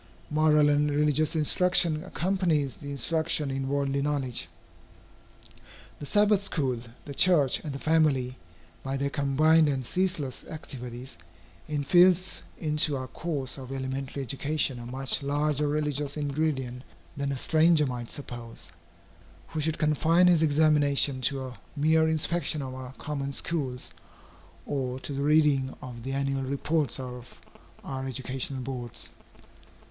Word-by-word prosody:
Moral 150 -1 +4
and 145 0 +3
religious 150 +2 +2
instruction 165 0 +3
accompanies 175 -7 0
the 145 - -8
instruction 155 0 0
in 135 0 -3
worldly 140 0 0
knowledge. 140 -4 -2 1.5
The 145 - -7
Sabbath 205 +4 +4
school, 135 -11 -1 0.3
the 140 - -7
church, 150 -4 +3
and 150 - -6
the 135 - -5
family, 140 -5 +1 0.4
by 135 +1 -3
their 140 +1 -1
combined 155 +3 +3
and 130 -3 -2
ceaseless 175 -5 0
activities, 125 - -7 0.5
infuse 175 +5 +3 0.2
into 150 -2 +3
our 130 - -4
course 140 -2 -4
of 130 0 -9
elementary 135 +1 -4
education 140 0 -2
a 120 - -8
much 130 +3 -2
larger 145 +1 0
religious 145 -1 -1
ingredient 140 -4 -2 0.3
than 140 0 -2
a 135 - -2
stranger 160 +2 +4
might 120 -3 -5
suppose, 120 -8 -8 0.8
who 160 - -4
should 160 +1 0
confine 160 +3 +3
his 175 -3 +5
examination 145 -3 +3
to 135 +1 0
a 125 -1 -10 0.2
mere 160 +2 +3
inspection 160 -1 0
of 130 -1 -6
our 130 0 -8
common 140 -1 -4
schools, 135 -4 -2 0.7
or 130 -3 -3
to 145 - -3
the 140 - -3
reading 145 -3 +3
of 125 -2 -9
the 135 +3 -4
annual 135 0 -1
reports 140 +2 -1
of 125 -1 -8 0.5
our 135 0 -5
educational 130 +1 -4
boards. 125 -2 -6
140 Hz, 130 wpm, -27 LUFS, 130-155 Hz, 1.5 s, his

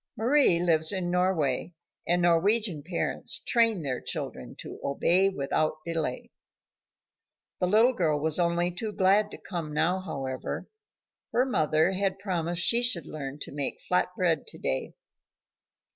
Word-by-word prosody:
Mari 245 -5 +4
lives 160 -2 +3
in 185 -3 -2
Norway, 175 -4 0 0.3
and 175 +1 +2
Norwegian 175 0 +2
parents 170 +4 -2
train 230 -7 +2
their 130 -3 -3
children - - -5
to - - -9
obey 175 +7 +2
without 155 -2 -1
delay. 160 -6 -3 1.3
The 180 - +1
little 225 +7 +4
girl 160 -8 +1
was 155 +2 -1
only 175 0 +1
too 210 +4 -5
glad 200 +2 +3
to - - -9
come 170 -5 -6
now, 180 +5 +1
however. 135 -8 -5 0.7
Her 250 +2 +3
mother 155 - +2
had 190 0 -1
promised 175 -3 -1
she 235 +5 +4
should 245 0 +3
learn 140 -2 -6
to - - -5
make 140 -1 -3
flat 180 - +1
bread 170 -4 +1
to - - -10
day. 65 - -3
175 Hz, 145 wpm, -27 LUFS, 155-195 Hz, 1.3 s, Mari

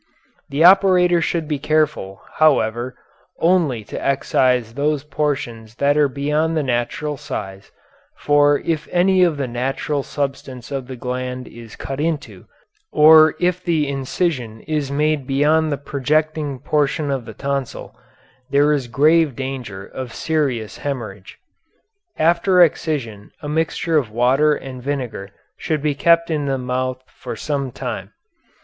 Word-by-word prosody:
The 145 +3 +1
operator 180 -2 +5
should 165 -2 -1
be 150 -2 -2
careful, 150 -10 -1
however, 125 -5 +2 0.4
only 165 -10 +2
to - - -7
excise 125 -4 +1
those 145 +1 0
portions 125 -7 -3
that 140 +3 +2
are 150 -1 +4
beyond 150 +4 0
the 155 - +1
natural 135 +4 -2
size, 100 -10 -7 0.5
for 145 0 +3
if 160 -2 -1
any 185 +1 +3
of 170 -4 +2
the 140 -2 -2
natural 135 +4 -2
substance 135 -3 -5
of 135 -2 -4
the 130 - -7
gland 125 0 -4
is 115 -2 -12
cut 135 0 -6
into, 155 -1 -3 0.4
or 155 +1 +7
if 180 0 0
the 160 -4 +1
incision 135 -4 -2
is 150 -3 -2
made 150 -1 0
beyond 150 +3 +2
the 145 - -1
projecting 150 +1 -1
portion 145 +2 0
of 130 -4 -2
the 110 - -10
tonsil, 140 -2 -4 0.5
there 145 +2 +3
is 135 -4 -1
grave 150 +3 +3
danger 125 -7 -6
of 130 -3 -8
serious 135 -10 -2
hemorrhage. 110 -9 -6 0.8
After 170 +3 +3
excision 130 -11 -2
a - - -4
mixture 160 +1 0
of 125 -7 -5
water 130 +7 +3
and 130 -3 -8
vinegar 125 -7 -4 0.3
should 155 -3 -2
be 150 -1 +1
kept 170 +3 +3
in 150 -2 -1
the 135 -1 0
mouth 130 0 -3
for - - -8
some 140 -3 -3
time. - - -6
140 Hz, 140 wpm, -20 LUFS, 125-155 Hz, 0.8 s, or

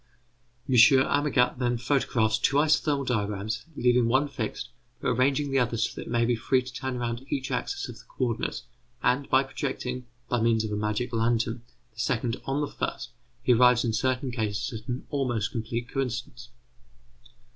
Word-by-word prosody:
M. 130 - 0 0.3
Amagat 140 -4 +2
then 120 -1 +1
photographs 115 -4 +1
two 140 - +2
isothermal 145 -2 +2
diagrams, 105 -3 -2
leaving 125 -2 +3
one 130 +5 +3
fixed, 125 -7 -4 0.3
but - - -1
arranging 135 +3 +1
the 135 - +3
other 120 -2 0
so 110 - 0
that - - -7
it - - -7
may 120 -1 +2
be 120 0 +2
free 130 +3 +1
to 130 0 -9
turn 130 0 -3
round 120 0 -3
each 135 -2 -2
axis - - -2
of - - -10
the - - -16
co 130 - -2
ordinates; 115 +1 -3 0.4
and 130 +3 +1
by 130 +1 +5
projecting, 130 -2 -4 0.2
by 120 -2 0
means 115 -1 +3
of 110 - -4
a - - -1
magic 105 +4 -2
lantern, 115 +1 +1 0.3
the 110 - -16
second 115 0 0
on 135 +2 -1
the 145 - 0
first, - - -4 0.3
he 125 - +5
arrives 125 0 +5
in 115 - 0
certain 130 +3 0
cases 110 0 -2
at 110 - -25
an 125 +1 -4
almost 125 -7 -1
complete 115 -1 -3
coincidence. 125 -2 -4
125 Hz, 180 wpm, -27 LUFS, 115-130 Hz, 0.4 s, by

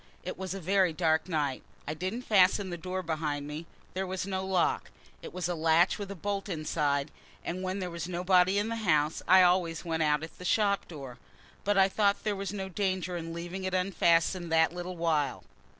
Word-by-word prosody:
It 185 - -4
was 190 0 -5
a - - -5
very 185 -1 +2
dark 160 +1 +1
night. 145 -5 -1 0.3
I 150 - -1
didn't 185 +10 -4
fasten 190 -2 +3
the - - -2
door 185 +2 -4
behind 155 -3 -2
me; 155 +3 -6 0.3
there 190 +1 -2
was 185 0 -3
no 190 -1 -2
lock; 190 -2 0 0.3
it - - -8
was 180 -1 -3
a 180 - -1
latch 165 +3 +3
with 200 -1 -5
a 200 - -5
bolt 200 +2 -3
inside, 150 -3 -1 0.3
and 180 +2 -3
when 185 +1 -2
there 180 -3 -4
was 170 +1 -5
nobody 180 +2 +3
in 205 +2 0
the 230 - -2
house 155 -7 +1
I 185 0 +8
always 175 -2 +2
went 165 -1 -1
out 150 0 +2
at 160 - -9
the - - -8
shop 200 +1 +1
door. 135 -6 -9 0.4
But 205 0 +1
I 190 0 +6
thought 200 0 +1
there 210 -1 0
was 195 -1 -4
no 195 -2 -4
danger 185 -2 -1
in 165 -1 -5
leaving 175 +3 -5
it 185 0 -1
unfastened 175 -2 +2
that 160 0 +4
little 180 0 -6
while. 160 -4 0
180 Hz, 210 wpm, -30 LUFS, 160-190 Hz, 0.4 s, I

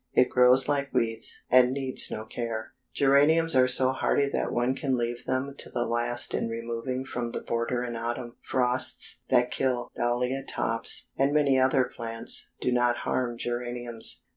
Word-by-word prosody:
It 125 - +3
grows 125 +1 +5
like 140 -1 -1
weeds, 115 -2 -1
and 125 0 +5
needs 135 -1 +1
no 110 - -6
care." 110 -1 -6 0.2
Geraniums 150 +4 +3
are 130 0 +4
so 130 0 +6
hardy 140 +1 0
that - - -3
one 120 +2 0
can 135 -1 -2
leave 120 0 -4
them 130 +2 -2
to - - -5
the 120 - -2
last 120 +1 +1
in - - -2
removing 115 +3 -5
from 120 -2 -5
the - - -4
border 120 +1 -3
in 120 -1 -5
autumn. 120 +1 -5
Frosts 125 0 +1
that 125 -1 +2
kill 125 -2 -2
Dahlia 125 +3 -1
tops, 115 -3 +1
and 135 +1 +2
many 145 -3 +2
other 130 0 +3
plants, 115 -2 +2
do 125 - -1
not 120 0 +1
harm 120 -2 -2
geraniums. 120 -1 -4
125 Hz, 165 wpm, -26 LUFS, 120-130 Hz, 0.2 s, so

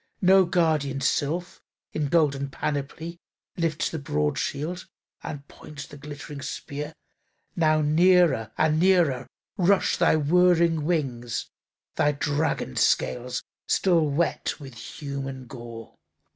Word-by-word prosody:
No 190 +1 +6
guardian 155 -6 +1
sylph, 155 +6 -1 0.3
in 150 -2 -1
golden 140 -3 +2
panoply, 150 +4 -4 0.4
Lifts 165 -3 -1
the 160 - -3
broad 75 - 0
shield, 160 +6 -3 0.3
and 145 -1 -7
points 150 -2 -10
the - - -12
glittering 145 0 -8
spear. 145 +2 -6 0.6
Now 155 -2 +3
near 160 - +4
and 155 0 +3
nearer 165 -9 +3 0.3
rush 185 0 +3
thy 170 -2 +4
whirring 165 0 +3
wings, 130 -9 -2 0.5
Thy 150 - +3
dragon 145 - -1
scales 125 0 +1 0.2
still 170 -5 +3
wet 165 +4 -1
with 135 -3 -10
human 135 +1 -6
gore. 120 -3 -9
150 Hz, 115 wpm, -26 LUFS, 140-170 Hz, 0.6 s, No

